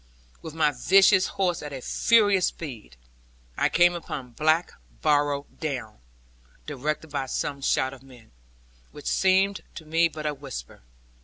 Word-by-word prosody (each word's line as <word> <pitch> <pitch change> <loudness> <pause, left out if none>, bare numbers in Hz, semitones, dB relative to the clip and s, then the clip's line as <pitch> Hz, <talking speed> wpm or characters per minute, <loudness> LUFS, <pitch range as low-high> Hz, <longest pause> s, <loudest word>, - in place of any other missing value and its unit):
With 160 -1 -9
my 155 -2 +3
vicious 190 +7 +4
horse 185 -4 -1
at 150 - -7
a 135 - -6
furious 205 - +3
speed, 115 - -8 0.6
I - - +1
came 175 0 +4
upon 140 -7 -6
Black 155 +7 +1 0.3
Barrow 145 -1 +2
Down, 130 - -5 0.7
directed 150 +2 -4
by 140 -2 -3
some 140 +2 -3
shout 130 0 +1
of 130 - -13
men, 125 - -17 0.6
which 145 - -12
seemed 190 +1 +2
to 160 - -9
me 165 +2 +3
but 155 -1 -8
a 150 - 0
whisper. 135 - -9
150 Hz, 145 wpm, -25 LUFS, 135-175 Hz, 0.7 s, vicious